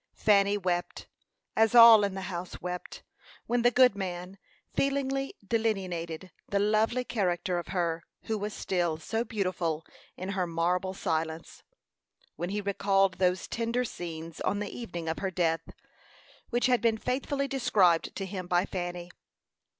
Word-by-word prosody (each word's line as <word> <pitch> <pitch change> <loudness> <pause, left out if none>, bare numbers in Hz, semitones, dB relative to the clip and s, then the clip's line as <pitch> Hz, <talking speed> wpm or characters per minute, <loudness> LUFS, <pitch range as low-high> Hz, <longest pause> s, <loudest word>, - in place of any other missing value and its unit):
Fanny 200 -1 +3
wept, 175 -2 -2 0.5
as 225 +2 +3
all 230 -3 +10
in 200 -1 -1
the 190 - -4
house 180 -1 -5
wept, 180 0 -6 0.4
when 240 0 +1
the 240 - +5
good 250 -3 +5
man 185 0 -5 0.3
feelingly 275 0 0
delineated 185 -6 -2 0.2
the 200 - +1
lovely 215 +4 +2
character 180 -6 -1
of 170 - -7
her 170 -2 -1 0.2
who 220 - -2
was 210 0 -3
still 175 -5 -1
so 225 +9 -2
beautiful 185 -8 -2 0.3
in 185 +2 -5
her 185 -2 -1
marble 180 +3 0
silence; 160 -1 -3 0.7
when 175 +3 -3
he 205 +1 -2
recalled 195 -1 +1
those 180 0 +1
tender 235 +2 -1
scenes 165 -5 -7
on 205 - 0
the 205 -1 -4
evening 175 -8 -6
of 160 - -2
her 190 - -1
death, 165 -3 0 0.8
which 240 0 +1
had 250 -1 +3
been 230 -2 +2
faithfully 275 +4 -1
described 210 -11 +2
to 195 - -3
him 185 -2 -6
by 180 +1 +2
Fanny. 175 -2 -5
190 Hz, 150 wpm, -29 LUFS, 175-225 Hz, 0.8 s, all